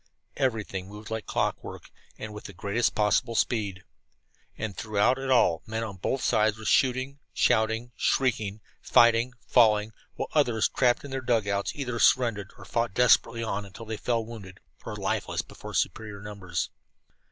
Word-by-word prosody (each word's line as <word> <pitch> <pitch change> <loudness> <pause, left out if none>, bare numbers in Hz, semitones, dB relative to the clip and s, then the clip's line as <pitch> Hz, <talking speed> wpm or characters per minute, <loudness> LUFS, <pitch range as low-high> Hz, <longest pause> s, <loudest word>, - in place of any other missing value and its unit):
Everything 110 -8 -1
moved 105 +2 -10
like 110 -1 -4
clockwork, - - -3 0.3
and 110 -1 -7
with 105 - -9
the 100 - -8
greatest 100 +6 0
possible 110 +3 +2
speed. 100 -6 0 0.7
And 110 -3 -4
throughout 110 +4 +1
it 135 0 -4
all 105 -10 +4
men 110 +1 -2
on 100 -4 -6
both 130 +8 -2
sides 110 0 +2
were 110 - -10
shooting, 130 +3 +2 0.2
shouting, 110 +1 +2
shrieking, 110 -5 0 0.2
fighting, 120 +1 +4
falling, 110 -3 +4 0.2
while - - -4
others, 120 -8 +3
trapped 125 +1 +2
in 140 - -8
their 135 0 -2
dug 120 -4 +1
outs, 100 0 -1
either 125 -5 -3
surrendered 115 -7 +3
or - - -12
fought 115 -4 -1
desperately 120 -1 +4
on 105 -2 -2
until 100 +3 -10
they 110 0 -4
fell 115 0 -1
wounded 100 -5 -10 0.2
or - - -6
lifeless - - -2
before - - -10
superior 105 -2 -2
numbers. 95 -6 -4
110 Hz, 160 wpm, -27 LUFS, 105-120 Hz, 0.7 s, all